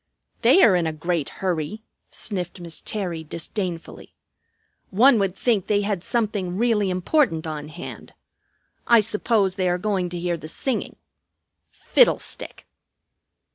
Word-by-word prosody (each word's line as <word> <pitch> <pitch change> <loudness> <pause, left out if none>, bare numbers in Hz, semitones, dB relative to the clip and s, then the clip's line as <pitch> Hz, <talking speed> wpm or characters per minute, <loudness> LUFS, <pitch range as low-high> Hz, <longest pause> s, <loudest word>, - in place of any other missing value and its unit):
"They 385 - +6
are 195 - +6
in 170 -2 +1
a 160 - -2
great 165 -1 -2
hurry," 185 +3 -3 0.3
sniffed 185 -3 -3
Miss 170 -2 -6
Terry 180 -6 -3
disdainfully. 170 +2 -5 0.7
"One 235 +4 +5
would 195 -2 0
think 215 -4 0
they 205 -1 +2
had 200 -3 -2
something 205 -6 -1
really 220 -3 +2
important 180 - +1
on 150 -2 -5
hand. 165 +3 -9 0.7
I 235 -1 +7
suppose 210 -2 +1
they 185 -1 0
are 175 - +1
going 185 -2 -1
to 175 0 -5
hear 175 0 -1
the 155 - -9
singing. 240 - -3 0.7
Fiddlestick!" - - +1
185 Hz, 135 wpm, -23 LUFS, 170-215 Hz, 0.7 s, I